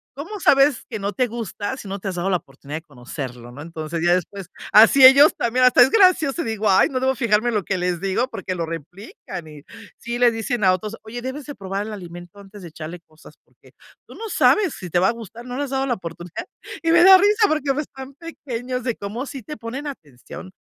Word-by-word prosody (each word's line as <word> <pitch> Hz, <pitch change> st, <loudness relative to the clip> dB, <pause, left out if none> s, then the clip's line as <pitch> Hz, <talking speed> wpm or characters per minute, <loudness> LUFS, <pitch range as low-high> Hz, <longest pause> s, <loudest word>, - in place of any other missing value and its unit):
"¿Cómo 335 Hz, +10 st, -7 dB
sabes 275 Hz, -4 st, +4 dB
que 220 Hz, -4 st, -5 dB
no 200 Hz, +1 st, -3 dB
te 255 Hz, -, +1 dB
gusta 230 Hz, 0 st, -5 dB
si 215 Hz, -, -10 dB
no 195 Hz, +1 st, -4 dB
te 195 Hz, -, -7 dB
has -, -, -4 dB
dado 175 Hz, +2 st, -2 dB
la 185 Hz, -, +2 dB
oportunidad 140 Hz, 0 st, -9 dB
de -, -, -23 dB
conocerlo?", 125 Hz, -4 st, -8 dB
¿no?, 135 Hz, +4 st, -10 dB
entonces, 160 Hz, 0 st, -6 dB
ya 175 Hz, -, +4 dB
después, 185 Hz, +1 st, -5 dB, 0.3 s
así 225 Hz, +5 st, +7 dB
ellos 280 Hz, +4 st, +8 dB
también, 250 Hz, +2 st, +2 dB
hasta 250 Hz, -, +6 dB
es 255 Hz, -, +3 dB
gracioso 355 Hz, -7 st, +3 dB
y -, -, -7 dB
digo: 220 Hz, -2 st, -1 dB
"Ay 190 Hz, -, +4 dB
no, 260 Hz, -, -2 dB
debo 265 Hz, +1 st, +1 dB
fijarme 235 Hz, -2 st, +1 dB
en 235 Hz, -, -2 dB
lo 205 Hz, -, 0 dB
que 190 Hz, +2 st, -2 dB
les 180 Hz, -1 st, -1 dB
digo, 195 Hz, +6 st, 0 dB
porque 185 Hz, -, -5 dB
lo 170 Hz, -2 st, -3 dB
replican", 165 Hz, -, -9 dB
y 150 Hz, -2 st, -13 dB, 0.3 s
sí 235 Hz, +1 st, -5 dB
le 245 Hz, -1 st, +6 dB
dicen 225 Hz, 0 st, -3 dB
a 185 Hz, -1 st, +5 dB
otros: 210 Hz, +4 st, -4 dB
"Oye, 230 Hz, +2 st, -7 dB
debes 260 Hz, +2 st, -6 dB
de 290 Hz, -, -7 dB
probar 195 Hz, +2 st, -4 dB
el 220 Hz, -, -6 dB
alimento 175 Hz, -1 st, -10 dB
antes 200 Hz, +1 st, -13 dB
de -, -, -8 dB
echarle 160 Hz, +2 st, -8 dB
cosas, 155 Hz, -2 st, -18 dB
porque -, -, -24 dB, 0.4 s
tú -, -, -13 dB
no 450 Hz, 0 st, -7 dB
sabes 390 Hz, -4 st, +3 dB
si 180 Hz, -, -8 dB
te 175 Hz, -, +2 dB
va 185 Hz, -, +3 dB
a -, -, +2 dB
gustar, 230 Hz, 0 st, -10 dB
no 250 Hz, 0 st, -6 dB
le 285 Hz, -, -1 dB
has 270 Hz, -, -10 dB
dado 270 Hz, 0 st, -1 dB
la 245 Hz, -, 0 dB
oportunidad", 175 Hz, -2 st, -8 dB, 0.4 s
y 330 Hz, -, +2 dB
me 345 Hz, +1 st, +6 dB
da 380 Hz, +1 st, +9 dB
risa 415 Hz, +3 st, +3 dB
porque 290 Hz, -3 st, 0 dB
pues 300 Hz, +2 st, -3 dB
están 265 Hz, +1 st, -11 dB
pequeños 255 Hz, -6 st, -6 dB
de 240 Hz, -2 st, -2 dB
cómo 215 Hz, +6 st, -6 dB
sí 270 Hz, -1 st, -8 dB
te 300 Hz, +6 st, -8 dB
ponen 255 Hz, +6 st, -6 dB
atención, 160 Hz, -, -10 dB
220 Hz, 245 wpm, -21 LUFS, 180-265 Hz, 0.4 s, da